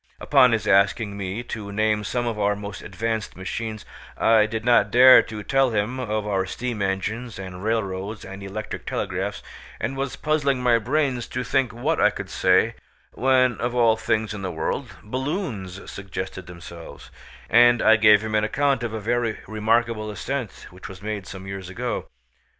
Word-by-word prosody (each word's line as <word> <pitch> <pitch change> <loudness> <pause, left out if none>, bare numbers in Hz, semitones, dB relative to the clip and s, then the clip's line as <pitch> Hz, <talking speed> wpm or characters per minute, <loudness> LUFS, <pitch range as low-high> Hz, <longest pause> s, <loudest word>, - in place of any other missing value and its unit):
Upon 130 -4 +5
his 110 -1 0
asking 100 +2 +3
me 100 +3 -4
to 105 -4 -6
name 105 0 +1
some 120 +4 -2
of 115 -3 -2
our 105 0 +2
most 100 -1 -7
advanced 110 +3 -3
machines, 110 +3 -5 0.3
I 110 -1 +4
did 110 +1 -4
not 120 -4 +4
dare 130 +3 +8
to 105 -1 -7
tell 135 +4 +2
him 110 +3 -1
of 110 -3 -2
our 95 -2 0
steam 120 +1 -4
engines 100 +5 -2
and 95 -1 -8
railroads 105 -2 -2
and 95 +1 -9
electric 100 +2 -6
telegraphs, - - -3 0.4
and 115 +6 -2
was 135 0 -3
puzzling 145 -4 0
my 120 -2 +4
brains 130 0 0
to 125 - -3
think 130 -1 +1
what 140 +8 -1
I 105 - +6
could 100 -2 -7
say, 95 +5 +3 0.4
when, 130 -2 +2
of 120 +1 -1
all 115 -2 +4
things 110 -1 -1
in 105 - -6
the 95 -2 -3
world, 85 - -3
balloons 125 - -4
suggested 95 -1 -6
themselves, 85 -4 -11 0.4
and 120 0 +6
I 110 - +7
gave 105 -1 +6
him 110 0 -4
an 105 0 +2
account 135 +4 +1
of 120 -2 -3
a 110 - -3
very 115 +1 -1
remarkable 110 0 0
ascent 125 +2 -5
which 90 +2 -10
was 95 0 -11
made 105 -3 -4
some 95 -1 -9
years 95 -1 -6
ago. 120 +6 -4
110 Hz, 175 wpm, -24 LUFS, 100-120 Hz, 0.4 s, dare